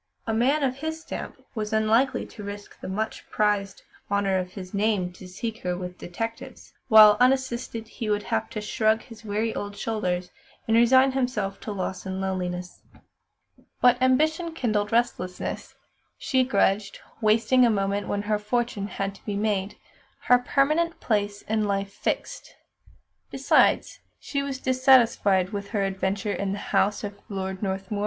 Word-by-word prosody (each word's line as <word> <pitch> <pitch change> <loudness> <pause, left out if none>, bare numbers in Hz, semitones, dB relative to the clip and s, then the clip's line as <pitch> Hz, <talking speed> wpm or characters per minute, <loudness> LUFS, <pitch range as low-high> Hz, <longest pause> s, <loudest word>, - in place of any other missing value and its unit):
A 225 - -1
man 270 +7 +2
of 260 -1 0
his 315 +2 -4
stamp - - -7 0.2
was 215 -2 -3
unlikely 220 +4 +2
to 210 - -11
risk 205 0 -8
the - - -7
much 215 +4 -4
prized 205 -2 0 0.3
"honour 200 -2 +1
of 180 0 -5
his 185 -1 -9
name" 200 -3 0
to 185 - -12
seek 220 +5 -5
her 180 -1 -2
with 180 0 -7
detectives; 225 +6 -6
while, 215 -1 +8
unassisted, 250 -3 +1
he 225 -1 -5
would 205 0 0
have 110 - -2
to 215 - -5
shrug 220 +1 +1
his 230 -2 -13
weary 220 +1 -1
old 205 0 -5
shoulders 180 -5 -2 0.4
and 225 - +3
resign 260 +3 +5
himself 250 -7 -2
to 215 - -6
loss 190 -1 -4
and 190 0 -3
loneliness. 180 -2 -4 1.0
But 245 0 +4
ambition 315 +6 +2
kindled 215 -7 0
restlessness. 205 -6 -2 0.4
She 260 -1 +1
grudged 200 -4 +1 0.2
wasting 225 +4 +4
a 240 - +5
moment 200 -1 0
when 205 0 -2
her 210 0 0
fortune 215 -1 -1
had 195 -1 -3
to 200 - -19
be 205 - -2
made, 205 -1 -1 0.5
her 250 0 +5
permanent 305 +7 +1
place 205 -2 -1
in 215 0 0
life 200 -1 -2
fixed. - - -4 0.7
Besides, - - +2 0.2
she 280 - -3
was 280 -1 -3
dissatisfied 250 -8 +3
with 200 -1 -4
her 205 -3 0
adventure 195 +1 -1
in 195 -1 -2
the - - -3 0.2
house 205 +2 +2
of 200 -1 -6
Lord 190 -1 -4
Northmuir. 195 +1 -3
210 Hz, 160 wpm, -25 LUFS, 195-240 Hz, 1.0 s, while